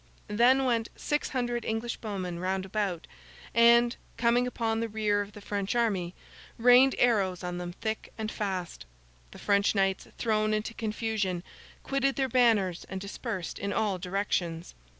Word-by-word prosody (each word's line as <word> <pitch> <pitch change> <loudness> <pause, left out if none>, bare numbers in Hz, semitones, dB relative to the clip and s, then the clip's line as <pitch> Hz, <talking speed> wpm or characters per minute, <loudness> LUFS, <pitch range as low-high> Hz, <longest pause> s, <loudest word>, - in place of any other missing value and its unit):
Then 250 +5 +4
went 230 -3 +1
six 295 0 -1
hundred 240 -3 -2
English 225 +2 -2
bowmen 185 -5 -4
round 190 +1 -1
about, 190 -4 -2 0.5
and, 235 +1 +5 0.2
coming 240 +1 +3
upon 225 -2 -1
the 230 0 -2
rear 210 -1 +1
of 205 0 -7
the 210 - -11
French 200 +1 -2
army, 195 -7 0 0.4
rained 250 +3 +6
arrows 195 -7 +2
on 180 0 -3
them 175 0 -5
thick 220 +3 -4
and 220 -1 -3
fast. 185 - -4 0.4
The - - -13
French 200 0 +2
knights, 195 -1 +1
thrown 215 -2 +1
into 215 +2 -3
confusion, 215 -5 -2 0.4
quitted 275 0 0
their 270 -1 +1
banners 220 -8 +3
and 190 - -4
dispersed 200 -1 -5
in 200 +1 -2
all 205 -3 0
directions. 180 -3 -2
215 Hz, 150 wpm, -29 LUFS, 190-235 Hz, 0.5 s, rained